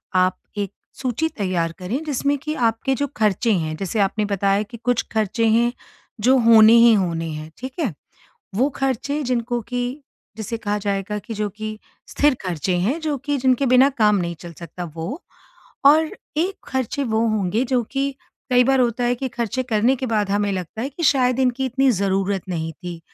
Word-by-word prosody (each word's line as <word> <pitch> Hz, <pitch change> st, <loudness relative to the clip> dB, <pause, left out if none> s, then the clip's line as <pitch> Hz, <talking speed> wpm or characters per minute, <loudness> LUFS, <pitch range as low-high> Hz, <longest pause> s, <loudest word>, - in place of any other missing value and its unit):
आप 185 Hz, 0 st, +3 dB, 0.2 s
एक 200 Hz, -2 st, -2 dB, 0.3 s
सूची 265 Hz, +5 st, 0 dB
तैयार 180 Hz, -4 st, 0 dB
करें, 220 Hz, +12 st, -3 dB
जिसमें 285 Hz, -1 st, 0 dB
कि 305 Hz, +3 st, -4 dB, 0.2 s
आपके 225 Hz, +4 st, -2 dB
जो 285 Hz, +2 st, -1 dB
खर्चे 215 Hz, +2 st, +2 dB
हैं, 160 Hz, -4 st, -1 dB
जैसे 195 Hz, +4 st, -3 dB
आपने 205 Hz, +2 st, +1 dB
बताया 200 Hz, 0 st, +1 dB
कि 215 Hz, +3 st, -11 dB
कुछ 245 Hz, -1 st, +1 dB
खर्चे 220 Hz, +1 st, 0 dB
हैं, 235 Hz, +2 st, +3 dB, 0.5 s
जो 260 Hz, +4 st, +5 dB
होने 225 Hz, -1 st, +7 dB
ही 235 Hz, -, +7 dB
होने 170 Hz, -5 st, 0 dB
हैं 155 Hz, +1 st, -7 dB
ठीक 260 Hz, +2 st, -7 dB
है, 265 Hz, -, 0 dB, 0.6 s
वो 250 Hz, +8 st, +2 dB
खर्चे 270 Hz, +3 st, -1 dB
जिनको 240 Hz, -2 st, -1 dB
कि 245 Hz, +2 st, -3 dB, 0.5 s
जिसे 220 Hz, +1 st, -4 dB
कहा 210 Hz, -1 st, -1 dB
जाएगा 200 Hz, +1 st, -1 dB
कि 225 Hz, +3 st, -7 dB
जो 210 Hz, 0 st, -1 dB
कि 215 Hz, +1 st, -6 dB, 0.3 s
स्थिर 295 Hz, -1 st, +3 dB
खर्चे 180 Hz, 0 st, -1 dB
हैं, 220 Hz, -, 0 dB
जो 310 Hz, -2 st, -1 dB
कि 285 Hz, +2 st, -2 dB
जिनके 260 Hz, +1 st, +2 dB
बिना 255 Hz, +2 st, +6 dB
काम 210 Hz, -1 st, +4 dB
नहीं 170 Hz, -2 st, -2 dB
चल 170 Hz, -1 st, -9 dB
सकता 175 Hz, +1 st, -7 dB
वो 180 Hz, -, -5 dB, 0.6 s
और 310 Hz, +3 st, +6 dB, 0.3 s
एक 360 Hz, +5 st, +1 dB
खर्चे 265 Hz, +2 st, -2 dB
वो 225 Hz, -1 st, +1 dB
होंगे 215 Hz, +2 st, 0 dB
जो 255 Hz, -1 st, +1 dB
कि, 275 Hz, +4 st, -2 dB, 0.4 s
कई 250 Hz, 0 st, +5 dB
बार 270 Hz, +1 st, +3 dB
होता 245 Hz, 0 st, +1 dB
है 240 Hz, 0 st, +2 dB
कि 260 Hz, +2 st, -4 dB
खर्चे 240 Hz, +1 st, -2 dB
करने 235 Hz, +1 st, +2 dB
के 260 Hz, -, -3 dB
बाद 210 Hz, -4 st, 0 dB
हमें 205 Hz, 0 st, +1 dB
लगता 185 Hz, +4 st, -4 dB
है 265 Hz, -, -2 dB
कि 290 Hz, +5 st, -8 dB
शायद 255 Hz, -3 st, +3 dB
इनकी 260 Hz, 0 st, +1 dB
इतनी 265 Hz, +1 st, +2 dB
ज़रूरत 195 Hz, -2 st, 0 dB
नहीं 165 Hz, -2 st, -3 dB
थी। 175 Hz, +1 st, -8 dB
225 Hz, 190 wpm, -22 LUFS, 195-260 Hz, 0.6 s, होने